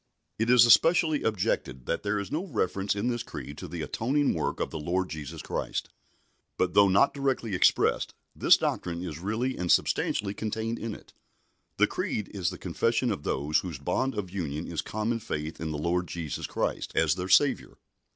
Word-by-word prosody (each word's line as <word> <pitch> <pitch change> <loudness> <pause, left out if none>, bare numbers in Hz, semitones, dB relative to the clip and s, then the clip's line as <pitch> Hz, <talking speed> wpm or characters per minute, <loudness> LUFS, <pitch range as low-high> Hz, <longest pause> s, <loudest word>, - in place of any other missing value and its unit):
It 115 +1 +1
is 125 -1 +8
especially 160 +4 +5
objected 65 - -1
that - - -1
there 105 0 -1
is 100 -1 -4
no 155 +5 -1
reference 100 - -1
in 105 +4 -1
this 120 -1 -1
Creed 75 - -7
to 90 - -6
the 85 -1 -5
atoning 135 - +1
work 80 - -2
of - - -2
the 80 - -4
Lord 90 +5 -1
Jesus 80 +1 -6
Christ. - - -3 0.7
But, 90 -1 +1
though 100 -1 +6
not 100 +9 +4
directly 135 -6 -1
expressed, 90 - +2 0.2
this - - +6
doctrine 85 0 -2
is 85 -4 -5
really 110 +8 -1
and 90 -1 +1
substantially 100 -1 +1
contained 110 +2 -3
in 115 -2 -4
it. - - -16 0.6
The - - +5
Creed 105 - -3
is 95 -4 0
the - - -7
confession 120 +1 0
of 100 - -3
those 75 +1 0
whose 85 -6 -5
bond 100 - -1
of 100 -4 -4
union 80 -5 -3
is 85 -3 -3
common 110 +2 -2
faith 80 -8 -5
in 80 - -2
the 75 - -3
Lord 85 +3 0
Jesus 80 -1 -4
Christ - - -2
as 80 -2 +3
their 90 +1 -4
Saviour. 95 - +3
95 Hz, 190 wpm, -28 LUFS, 85-115 Hz, 0.7 s, is